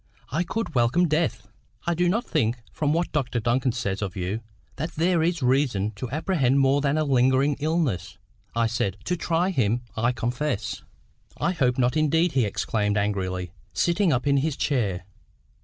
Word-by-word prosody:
I 155 +5 +1
could 220 0 -3
welcome 125 +8 +3
death." 150 -10 0 0.4
"I 170 - +1
do 175 +1 +2
not 230 +6 0
think, 120 -6 0 0.2
from 150 -1 0
what 170 +2 0
Dr 130 -5 -1
Duncan 120 +3 +1
says 100 -5 -3
of 95 -4 -3
you, 95 +3 -2 0.4
that 160 +4 -3
there 170 +1 +2
is 165 -2 0
reason 125 -6 +2
to 110 +4 -6
apprehend 140 -2 +1
more 135 +1 +3
than 140 +1 +1
a 155 - +2
lingering 135 +1 +3
illness," 145 - -1 0.4
I 115 0 +2
said—to 110 - -1
try 175 +2 0
him, 120 - +1
I 115 +2 +2
confess. 125 -1 -2 0.6
"I - - +1
hope 130 -8 +1
not 125 +1 +2
indeed," 160 +3 +2
he 130 -6 +2
exclaimed 105 0 -1
angrily, 95 -3 -1 0.2
sitting 175 +1 +2
up 125 -3 0
in 140 -1 +3
his 145 +1 0
chair. 100 - 0
130 Hz, 170 wpm, -25 LUFS, 115-160 Hz, 0.6 s, welcome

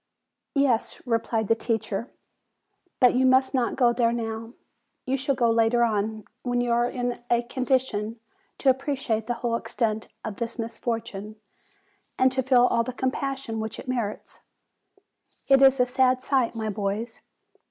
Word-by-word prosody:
"Yes," 270 -5 +1
replied 230 -2 0
the 225 - +5
teacher; 225 0 -2 0.9
"but 250 - +6
you 255 +1 +2
must 260 +1 +4
not 250 -3 0
go 245 -2 +4
there 235 -1 +2
now. 225 0 -4 0.5
You 260 0 0
shall 270 +1 0
go 235 -2 +2
later 230 +1 +3
on, 215 -1 -1 0.2
when 245 -1 -1
you 245 0 0
are 240 +1 +2
in 245 -1 -3
a 240 0 +3
condition 240 -3 -1 0.4
to 270 - +4
appreciate 260 -5 -2
the 240 - -1
whole 235 0 -1
extent 225 -1 -2 0.2
of 215 -2 -5
this 235 0 -4
mis 230 -1 -5
fortune, 220 -3 -4 0.8
and 260 0 +4
to 260 0 0
feel 250 -1 +4
all 235 - +2
the 255 - -5
compassion 260 -2 -2
which 220 0 -4
it - - -9
merits. 235 -5 -4 1.1
It 270 0 +5
is 270 -1 +6
a 250 - +5
sad 255 0 +2
sight, 260 -4 +1
my 220 -1 -2
boys. 210 +3 -3
240 Hz, 160 wpm, -25 LUFS, 225-255 Hz, 1.1 s, but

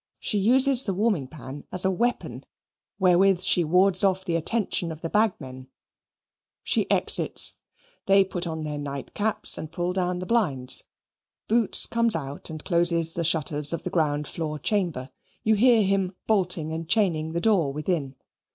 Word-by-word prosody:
She 210 - -2
uses 260 +5 +3
the 195 - -3
warming 200 - -1
pan 140 0 -10
as 185 +1 +2
a 190 - +2
weapon 240 +6 -3 0.5
wherewith 190 0 +3
she 180 -1 +3
wards 185 +4 +3
off 190 -1 0
the 170 -3 -2
attention 180 0 -2
of 160 0 -10
the 165 - -5
bagmen. 135 -12 -2 1.0
She - - 0
exits. - - +2 0.5
They 195 0 +4
put 180 -2 -4
on 160 -1 -5
their 150 -1 -5
night 140 -1 -7
caps 215 +1 +2
and 155 - -8
pull 175 +1 -3
down 180 -1 -2
the 180 - -6
blinds. 160 - 0 0.6
Boots 230 -1 +4
comes 230 -1 +2
out 140 -1 -6
and 155 -1 -9
closes 170 -2 +2
the 170 - -3
shutters 150 -2 +2
of 170 - -5
the 180 - -5
ground 150 -3 -1
floor 155 -2 -5
chamber. 160 -7 -2 0.3
You 220 - +2
hear 230 +1 +4
him 195 -1 -1
bolting 180 -7 0
and 165 0 -6
chaining 165 -7 0
the 170 - -1
door 185 -10 +1
within. 150 -2 -3
175 Hz, 165 wpm, -24 LUFS, 155-200 Hz, 1.0 s, They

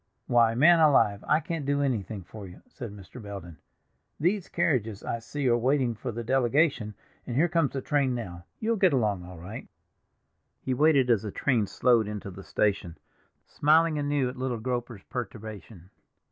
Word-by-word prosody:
"Why, 115 -2 +3
man 165 +7 +6
alive, 135 -10 +4
I 150 - +4
can't 165 -4 -4
do 145 +1 0
anything 110 -7 -2
for 100 +3 -10
you," 90 - -14
said 130 - -8
Mr. 105 +4 -11
Belden. 95 -7 -9 0.6
"These 180 +4 0
carriages 115 - 0
I 115 - -3
see 140 +4 -3
are 120 - +4
waiting 125 0 +1
for 120 +3 -5
the 120 +1 -5
delegation, 130 -2 +1 0.3
and 120 - -4
here 160 +6 +4
comes 165 -4 +1
the 135 - -3
train 140 -4 +1
now; 90 -7 -7
you'll 225 +1 0
get 190 -5 +4
along 105 -8 +1
all 90 0 -10
right." 90 +7 -8 0.9
He 130 - -2
waited 140 -2 +4
as 110 -4 +3
the 105 - -5
train 115 0 0
slowed 115 +1 +2
into 105 -2 -6
the 95 +1 -10
station, 95 -4 -1 0.5
smiling 155 +1 +3
anew 145 -2 0
at 125 +1 -6
little 130 -2 -2
Groper's 120 -3 -4
perturbation. 105 -5 -8
120 Hz, 175 wpm, -27 LUFS, 105-145 Hz, 0.9 s, man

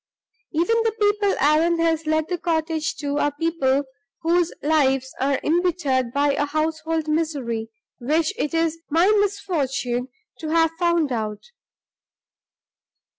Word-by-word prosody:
"Even 345 +8 +1
the 450 -1 0
people 410 -1 +2
Allan 315 +4 +3
has 325 -1 0
let 315 0 +1
the 355 -1 -3
cottage 320 -2 -1
to 290 -1 -2
are 290 - +1
people 285 -5 +1 0.4
whose 345 +1 +2
lives 270 -4 +2
are 270 0 +1
imbittered 310 -7 +1
by 285 +2 +2
a 290 +1 0
household 315 +1 -1
misery 280 -8 -2 0.3
which 310 +8 +1
it 300 -10 -2
is 330 0 0
my 330 +4 +3 0.2
misfortune 275 -11 -1 0.3
to 315 - -5
have 325 0 +3
found 340 -5 +2
out!" 215 -3 -3
315 Hz, 125 wpm, -23 LUFS, 280-335 Hz, 0.4 s, Allan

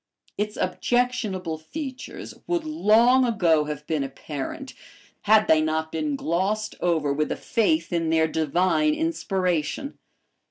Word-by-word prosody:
Its 210 +1 -3
objectionable 190 -5 -1
features 260 - -7
would 345 -2 0
long 255 -4 +4
ago 170 -10 +2
have 150 0 -6
been 155 -3 -1
apparent 140 - -6 0.5
had 215 +1 +5
they 155 -1 +5
not 160 0 -1
been 155 -3 -2
glossed 195 +8 -1
over 160 -5 +1
with 150 +2 -1
a - - 0
faith 235 - 0
in 165 -1 0
their 160 0 +3
divine 180 - +1
inspiration. 195 - -2
185 Hz, 125 wpm, -24 LUFS, 160-245 Hz, 0.5 s, had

